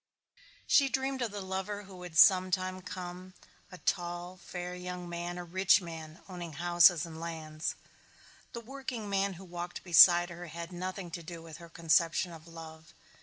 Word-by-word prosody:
She 275 -2 +4
dreamed 265 0 -1
of 240 - 0
the 205 -1 -6
lover 190 +2 -4
who 195 -1 -13
would 180 -2 -8
some 185 +1 +7
time 185 0 -2
come, 180 0 -8 0.4
a 180 - -9
tall 175 0 -2
fair 180 -1 -6
young 180 0 -6
man, 175 +1 -4
a 175 - -5
rich 185 +3 +4
man 165 -2 -9
owning 175 -4 -7
houses 175 +1 +5
and 160 -1 -9
lands. 160 -1 -4 0.8
The 235 - -5
workingman 220 -6 -3
who 190 +2 -11
walked 175 0 -6
beside 175 0 +7
her 175 0 -8
had 170 +2 -7
nothing 185 0 -5
to 170 - -5
do 165 0 -9
with 165 -1 -10
her 170 0 -12
conception 165 +2 +2
of 165 0 -12
love. 160 -1 -11
175 Hz, 170 wpm, -31 LUFS, 170-185 Hz, 0.8 s, some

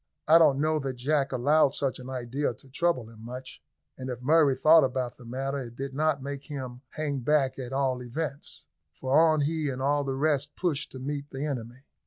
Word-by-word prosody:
I 160 +2 +8
do 165 - +8
not 135 - +3
know 155 +2 +1
that 135 -2 -3
Jack 135 +3 0
allowed 140 +3 +3
such 135 -2 -1
an 130 0 -9
idea 130 +2 -2
to 135 - -16
trouble 150 -6 0
him 110 -1 -14
much, 125 +3 -8 0.4
and 130 0 -5
if 125 -2 -4
Murray 145 +1 +4
thought 155 +4 +6
about 130 -1 -2
the 125 - -12
matter 135 +3 -3
it 120 -3 -8
did 135 +1 -5
not 150 -1 0
make 140 0 -6
him 130 -4 -6
hang 145 -3 -3
back 135 0 +1
at 125 -1 -5
all 135 -2 0
events; 140 +4 -5 0.3
for 130 +6 -5
on 155 -1 +5
he 155 0 0
and 130 -1 -4
all 145 +2 +1
the 135 -1 -2
rest 145 0 0
pushed 165 -6 -2
to - - -7
meet 145 +2 -4
the 135 +2 -4
enemy. 125 -2 -5
135 Hz, 215 wpm, -28 LUFS, 130-150 Hz, 0.4 s, I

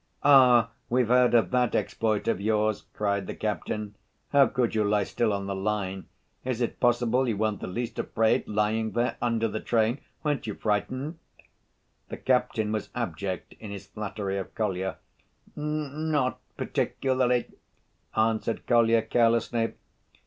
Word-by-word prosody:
"Ah, 125 -5 +6 0.2
we've 125 -1 +2
heard 125 -1 +5
of 115 - +3
that 125 -2 +2
exploit 110 -1 0
of 105 -4 +1
yours, 110 0 +1
too," - - -32
cried 100 -2 -1
the - - -5
captain. 105 -1 -3 0.4
"How 140 -1 +6
could 125 -3 0
you 110 -1 +2
lie 105 0 +2
still 110 +3 0
on 100 -1 -2
the 100 - -3
line? 95 -1 -2 0.4
Is 125 -2 -2
it 120 - -2
possible 120 +1 +2
you 110 -4 0
weren't 105 -1 0
the - - -5
least 120 +5 -4
afraid, 110 0 +1
lying 110 +1 0
there 120 +1 0
under 115 -1 +1
the 110 0 -3
train? 115 +4 +1 0.2
Weren't 145 -6 -1
you 105 - -3
frightened?" 130 +9 -2 0.9
The - - -5
captain 125 -4 +1
was 110 -1 -3
abject 95 -5 -4
in 110 - -8
his 100 -1 -7
flattery 100 -1 -4
of 95 - -8
Kolya. 95 -3 -2 0.6
"N—not 150 -2 -1 0.2
particularly," 130 -2 0 0.7
answered 110 +1 0
Kolya 115 -2 +4
carelessly. 115 0 +2
115 Hz, 150 wpm, -27 LUFS, 105-125 Hz, 0.9 s, Ah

